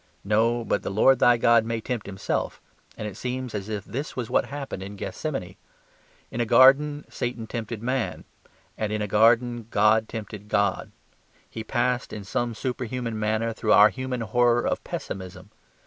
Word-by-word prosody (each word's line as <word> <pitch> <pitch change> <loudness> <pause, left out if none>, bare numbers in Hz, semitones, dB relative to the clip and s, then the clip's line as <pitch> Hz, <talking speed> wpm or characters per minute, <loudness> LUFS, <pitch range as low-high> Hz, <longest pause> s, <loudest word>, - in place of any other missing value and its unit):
No; 115 +3 +1
but - - 0
the - - -4
Lord 120 +7 +4
thy 120 -1 +5
God 115 -1 +4
may 115 0 -2
tempt 115 -2 -4
Himself; 95 -1 -3 0.4
and 105 - -4
it 105 - -7
seems 125 -1 -4
as 105 0 -4
if 105 -2 -4
this 140 +5 -5
was 120 -3 -4
what - - +3
happened 140 -8 -6
in 100 +2 -7
Gethsemane. 100 - -5 0.7
In 120 - -2
a - - +3
garden 145 +4 +5
Satan 120 -2 -4
tempted 115 -1 -5
man: 130 0 -2 0.6
and 110 -1 -1
in 105 0 -1
a - - -2
garden 115 +2 +3
God 110 +1 +3
tempted 105 -2 -7
God. 100 -3 0 0.6
He 110 - -7
passed 125 +1 -1
in 105 - -6
some 115 +4 -2
superhuman 125 -1 -3
manner 110 +2 0
through 110 -1 +1
our 105 +1 +8
human 130 -1 -4
horror 120 +1 +2
of - - -1
pessimism. 95 +1 -7
115 Hz, 170 wpm, -25 LUFS, 105-125 Hz, 0.7 s, our